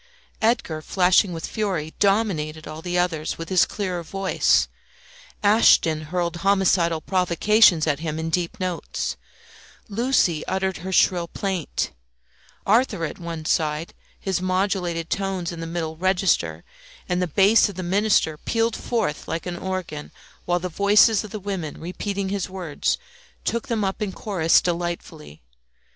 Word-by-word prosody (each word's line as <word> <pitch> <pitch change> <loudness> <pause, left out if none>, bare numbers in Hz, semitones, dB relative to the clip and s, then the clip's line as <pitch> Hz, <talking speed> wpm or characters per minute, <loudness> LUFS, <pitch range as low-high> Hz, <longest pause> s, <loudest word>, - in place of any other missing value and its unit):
Edgar, 220 -9 +1
flashing 185 +3 +3
with 165 -1 -5
fury, 185 -8 -2
dominated 185 -7 +1
all 155 +1 -7
the 180 +1 -2
others 165 -3 -1
with 165 0 -7
his 185 -2 +4
clearer 185 -4 -3
voice; 195 +3 +1 0.8
Ashton 165 -7 +4
hurled 170 +1 -2
homicidal 180 -3 +2
provocations 185 0 +4
at 145 -3 0
him 155 -1 -3
in 160 0 -3
deep 170 0 -1
notes; 185 -2 -3 0.7
Lucie 210 - +1
uttered 190 0 -1
her 185 +3 -6
shrill 175 -1 +3
plaint, 190 -3 -3 0.7
Arthur 210 -5 +2
at - - -7
one 165 -2 -6
side, 155 0 0 0.3
his 190 -2 -2
modulated 185 -3 -1
tones 190 -3 -2
in 170 - -7
the 165 - -5
middle 165 -1 -3
register, 185 +2 +1 0.4
and 180 0 0
the 180 - +1
bass 200 +7 +4
of 200 - -8
the 185 - -4
minister 185 -4 +2
pealed 230 0 0
forth 220 -11 -2
like 165 +1 -3
an 180 -1 -4
organ, 185 -6 -5 0.3
while 175 0 +1
the 180 +1 -3
voices 205 +5 +4
of 215 - -8
the 215 - -6
women 190 -6 -5
repeating 190 +3 -3
his 195 -2 -2
words 180 -6 -2 0.5
took 235 - -1
them 225 -3 -1
up 195 +2 -2
in 205 -2 -1
chorus 180 -5 +2
delightfully. 170 - -4
180 Hz, 145 wpm, -23 LUFS, 165-195 Hz, 0.8 s, his